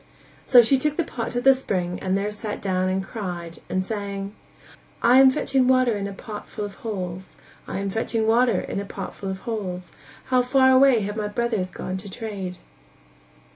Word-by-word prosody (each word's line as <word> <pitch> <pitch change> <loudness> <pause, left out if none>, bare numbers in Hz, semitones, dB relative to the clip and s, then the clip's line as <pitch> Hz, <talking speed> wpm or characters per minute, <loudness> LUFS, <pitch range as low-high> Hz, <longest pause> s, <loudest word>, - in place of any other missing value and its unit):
So 245 -2 +8
she 265 +4 +3
took 300 +2 -1
the 340 - +2
pot 235 -6 -4
to 245 - 0
the 270 +1 +7
spring 180 -9 -2
and 190 0 0
there 205 +1 -1
sat 210 0 -5
down 185 -1 0
and 190 +1 -1
cried 175 -5 -6
and 185 0 -1
sang: 200 -1 -4 0.7
"I 245 +3 +6
am 265 0 +8
fetching 260 0 +1
water 255 -3 +4
in 200 -1 -3
a - - -6
pot 210 +2 -8
full 210 - -4
of 205 - -7
holes, 185 -4 -5 0.3
I - - -4
am 195 0 -2
fetching 225 +1 -1
water 230 -2 +3
in - - -4
a 200 - -4
pot 195 -1 -6
full 195 - -6
of 190 0 -5
holes, 185 -6 -5 0.4
How 255 -1 +5
far 260 +1 +4
away 260 -3 +6
have 205 +2 -4
my 210 -1 -1
brothers 215 -3 -1
gone 185 +1 -5
to 200 +2 -8
trade." 195 -4 -5
210 Hz, 200 wpm, -24 LUFS, 190-245 Hz, 0.7 s, So